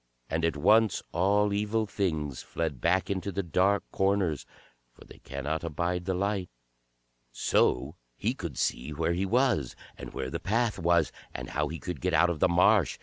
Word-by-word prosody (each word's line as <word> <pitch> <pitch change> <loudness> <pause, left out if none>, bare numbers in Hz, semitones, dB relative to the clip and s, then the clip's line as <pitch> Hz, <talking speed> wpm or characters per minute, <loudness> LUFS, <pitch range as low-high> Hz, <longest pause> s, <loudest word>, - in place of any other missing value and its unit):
And 80 +2 0
at 85 -3 +1
once 110 +7 +4
all 100 +4 +2
evil 105 +2 0
things 80 -10 -2
fled 80 -6 -4
back 95 +1 +2
into 100 +1 -2
the 100 +2 -2
dark 95 +4 +2
corners, 95 -6 0 0.5
for - - -16
they - - -15
cannot 75 +4 -4
abide 85 +2 -2
the 95 -1 0
light. 100 -1 -1 0.8
So - - +1 0.2
he 115 +5 0
could 85 - -6
see 60 +5 -1
where 80 +3 0
he 95 +3 -1
was, 115 - +1 0.2
and - - -9
where 65 - -4
the - - -3
path 115 +1 0
was, 85 0 +2 0.2
and - - -6
how 75 +1 0
he 80 - -5
could 90 +2 -6
get 90 -2 +1
out 85 +2 +4
of 80 - -4
the 90 - +4
marsh. 85 +1 +4
90 Hz, 180 wpm, -29 LUFS, 80-100 Hz, 0.8 s, once